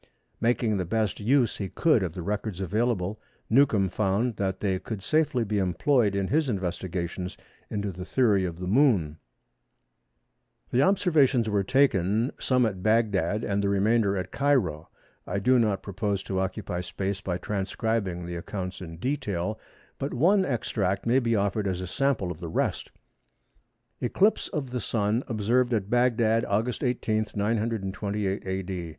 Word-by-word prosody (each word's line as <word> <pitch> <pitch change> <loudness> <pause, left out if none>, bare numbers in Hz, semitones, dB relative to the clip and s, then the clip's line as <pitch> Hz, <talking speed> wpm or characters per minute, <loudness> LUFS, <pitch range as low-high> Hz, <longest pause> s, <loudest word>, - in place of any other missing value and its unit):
Making 115 -2 +1
the 95 - 0
best 105 +3 -1
use 120 +2 +2
he 100 -2 -4
could 155 -9 +3
of 90 -4 -2
the 90 - -6
records 105 0 -3
available 105 0 -1 0.3
Newcomb 110 -6 +4
found 105 +5 0
that 95 -1 -1
they 95 -3 0
could 105 -2 -6
safely 155 -5 +1
be 105 -1 -1
employed 100 - +2
in 95 -1 -1
his 150 -1 +2
investigations 90 -2 -3 0.3
into 100 -1 -2
the 90 +1 -7
theory 105 -2 +2
of 85 -2 -3
the 90 - -5
Moon. 95 - +2 1.5
The 125 - +3
observations 145 - +3
were 105 -2 +1
taken, 115 -2 +2
some 125 -2 +2
at 95 -4 -3
Bagdad 105 -2 +1
and 100 0 0
the 100 - +1
remainder 100 0 +2
at 90 0 -4
Cairo. 115 - +1 0.4
I - - -2
do 125 +6 +3
not 105 -5 +1
propose 100 0 -2
to 95 -1 -2
occupy 90 -1 -3
space 95 +2 -3
by 90 -2 -2
transcribing 100 -2 -2
the 85 0 -5
accounts 90 +1 -5
in 80 -2 -8
detail, 110 - -2 0.4
but 140 -1 -3
one 190 +9 +4
extract 100 -6 -1
may 120 +3 +4
be 115 -3 +1
offered 100 0 0
as 90 -2 -1
a 95 - -4
sample 130 -4 0
of 80 - -8
the 85 - -6
rest—"Eclipse 120 - -3
of 140 -6 -4
the 125 -1 -2
Sun 110 +3 0
observed 120 +2 +1
at 100 -2 -3
Bagdad, 115 -2 +3
August 115 +7 -1
18, 110 -4 0
928 105 -2 -1
A.D. 95 -2 -3
105 Hz, 155 wpm, -27 LUFS, 95-120 Hz, 1.5 s, Newcomb